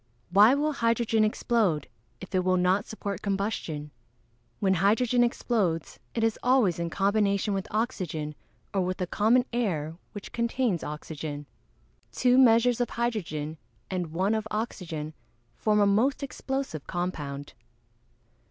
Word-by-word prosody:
Why 210 +7 +7
will 300 +2 +1
hydrogen 230 -4 +2
explode, 215 - +1 0.3
if 190 +1 -10
it 185 -1 +2
will 185 0 +2
not 180 +2 +2
support 200 -3 -5
combustion? 195 -7 -2 0.7
When 195 -3 +3
hydrogen 225 +7 +3
explodes 205 -9 -1 0.2
it 230 - 0
is 225 -1 +1
always 245 -10 +3
in 170 0 -1
combination 200 +2 +1
with 195 -1 -2
oxygen, 175 -9 -2 0.4
or 195 - +2
with 185 0 -1
the 185 - -1
common 225 +7 +3
air, 165 -10 -1 0.2
which 205 -2 -8
contains 235 -5 0
oxygen. 150 -1 -6 0.7
Two 250 0 +3
measures 245 -1 +5
of 245 - 0
hydrogen 165 -10 -3 0.3
and 180 -2 -1
one 185 +6 0
of 220 -1 -1
oxygen 170 -8 -4 0.4
form 210 -1 +2
a 205 - +5
most 230 +9 +2
explosive 265 - -4
compound. 150 -6 -4
200 Hz, 135 wpm, -27 LUFS, 170-230 Hz, 0.7 s, Why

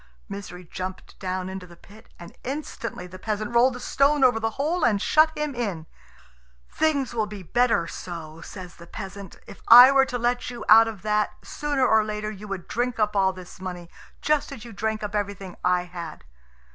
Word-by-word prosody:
Misery 195 -3 -8
jumped 185 +2 -7
down 185 -1 -3
into 190 -1 -7
the 170 - -14
pit, 210 +5 -17
and 170 0 -12
instantly 255 -8 -5
the 185 +1 -11
peasant 215 +2 -3
rolled 245 +2 +4
the - - -7
stone 280 +2 +2
over 245 -3 +5
the 225 0 0
hole 315 +5 0
and 215 -5 +3
shut 310 +9 +4
him 300 -1 -2
in. 200 -10 -3 0.9
"Things 285 -6 0
will 220 -3 0
be 205 -2 -8
better 235 -1 +2
so," 165 -2 -8
says 180 -1 -10
the 170 - -13
peasant. 195 0 -8
"If - - -12
I 245 +3 +11
were 270 -1 +5
to 250 - -2
let 245 +1 0
you 240 -1 -7
out 225 +1 +8
of 215 -4 -7
that, 210 0 +1
sooner 290 -3 -1
or 220 -3 +4
later 215 0 -4
you 210 0 -9
would 195 -3 -5
drink 245 +1 -1
up 210 -1 +1
all 190 -1 +3
this 185 0 -12
money, 180 -2 -7 0.3
just 300 -2 +1
as 250 -4 -9
you 235 - -10
drank 220 +1 -2
up 210 - -4
everything 200 -3 -3
I 180 0 +2
had." 175 -3 -8
210 Hz, 195 wpm, -25 LUFS, 185-245 Hz, 0.9 s, I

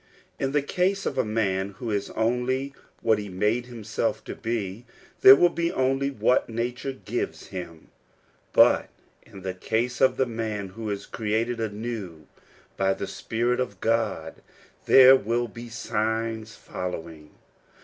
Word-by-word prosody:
In 135 - 0
the 145 0 +1
case 190 +6 0
of - - -1
the 130 - +1
man 100 -3 -1
who 120 -3 -4
is 100 -1 -1
only 125 +4 0 0.3
what 110 -2 +3
he 105 -1 -6
made 105 +6 0
himself 115 -4 -3
to - - -6
be, 110 -2 -3 0.4
there 130 - +11
will 175 - +5
be 170 0 -1
only 135 +1 +1
wh^t 130 -3 +1
nature 120 +4 -3
gives 115 -1 -4
him; 85 -4 -8 0.6
but - - +5 0.3
in 95 -2 -13
the 95 -1 -3
case 115 +7 -2
of 130 - +4
the 130 - +3
man 110 -4 -4
who 110 +3 -6
is 100 -1 -4
created 115 +2 -1
anew 105 -7 -5 0.5
by 95 0 +2
the - - -4
Spirit 120 +2 -1
of 100 -7 -3
God, 110 -8 -1 0.5
there 130 0 +9
will 120 0 0
be 115 +2 -10
signs 110 0 -2
following. 80 -4 -6
115 Hz, 150 wpm, -26 LUFS, 100-125 Hz, 0.6 s, there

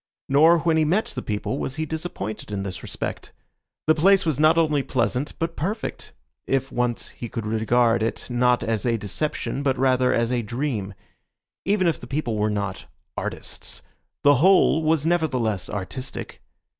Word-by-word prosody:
Nor 160 +5 +6
when 165 0 +2
he 160 - +4
met 180 +8 +2
the 125 - -4
people 105 +5 -3
was 135 - -3
he 160 0 -2
disappointed 155 - -5
in 100 -1 -2
this 95 -2 -5
respect. - - -5 0.5
The 155 - +5
place 195 +4 +4
was 155 -4 0
not 155 +2 +5
only 155 -3 +3
pleasant, 130 +1 -1
but 165 0 -2
perfect, 205 +9 -4 0.4
if 135 0 0
once 120 -1 -1
he 120 - -8
could 115 -3 -5
regard 115 +2 +2
it 115 - -2
not 125 0 +2
as 110 -2 -1
a 120 -2 +1
deception 135 +6 -3
but 135 -2 +1
rather 130 -1 +3
as 115 0 +1
a 125 -1 +1
dream. 110 -4 -3 0.7
Even 200 -1 +2
if 170 - +1
the - - -10
people 135 -5 -2
were 105 0 +1
not 100 -3 -3 0.3
"artists," - - -5 0.4
the 145 -1 +6
whole 185 -3 +5
was 160 -1 +1
nevertheless 130 - 0
artistic. 105 +6 -6
130 Hz, 170 wpm, -24 LUFS, 115-160 Hz, 0.7 s, Nor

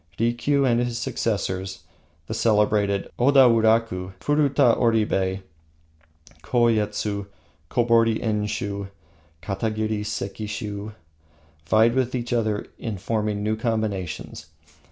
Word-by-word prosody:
Rikiu 120 +5 +1
and 120 -2 +3
his 120 -1 -1
successors, 95 -5 -2 0.4
the 110 - -5
celebrated 105 -2 +2
Oda 135 +1 +6
wuraka, 110 -5 +2
Furuka 140 -4 +3
Oribe, 100 -5 +1 1.0
Koyetsu, 105 -1 0 0.4
Kobori 115 -2 +3
Enshiu, 105 -2 -2 0.5
Katagiri 110 +2 -2
Sekishiu, 105 0 -5 0.7
vied 110 +2 +5
with 130 0 0
each 120 -1 -3
other 110 -2 0
in 110 -3 -4
forming 105 +1 -2
new 110 +1 0
combinations. 110 -9 -3
110 Hz, 95 wpm, -24 LUFS, 100-115 Hz, 1.0 s, Oda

